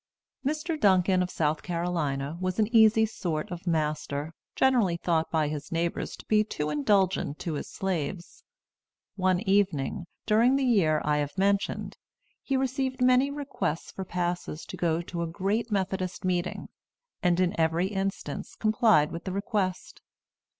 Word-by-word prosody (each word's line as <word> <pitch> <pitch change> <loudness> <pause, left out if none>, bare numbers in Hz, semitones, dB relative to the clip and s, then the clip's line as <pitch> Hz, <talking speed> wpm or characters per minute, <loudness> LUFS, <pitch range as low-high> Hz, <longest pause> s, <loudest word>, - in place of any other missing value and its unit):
Mr. 310 +3 -2
Duncan, 185 -4 +4
of 180 - -1
South 155 -2 0
Carolina, 165 -5 -2
was 185 0 -1
an 220 +2 +1
easy 220 0 +6
sort 170 -7 -3
of 175 +1 -7
master, 150 -1 -1 0.2
generally 235 -10 +3
thought 165 -2 0
by 155 -2 +1
his 150 0 -5
neighbors 170 0 -2
to - - -13
be 215 0 +3
too 150 -7 -3
indulgent 175 0 +1
to 165 - -4
his 145 - -4
slaves. 185 - -4 0.7
One 185 -2 +2
evening, 190 -7 +1 0.2
during 230 +4 +4
the 275 -1 +1
year 170 -11 +3
I 150 0 +2
have 145 +3 -3
mentioned, 200 +1 0 0.4
he 275 - 0
received 260 0 -1
many 255 +2 +4
requests 280 - -3
for 190 - -5
passes 175 -3 -3
to - - -7
go 170 0 0
to 170 0 -5
a 170 - -1
great 200 +7 -1
Methodist 190 -2 -2
meeting, 180 0 -1 0.5
and 180 -2 +2
in 180 -1 +2
every 165 +3 +2
instance 195 -1 -4
complied 215 - +3
with 170 - -6
the 190 - -3
request. 195 -1 -2
185 Hz, 150 wpm, -28 LUFS, 165-215 Hz, 0.7 s, easy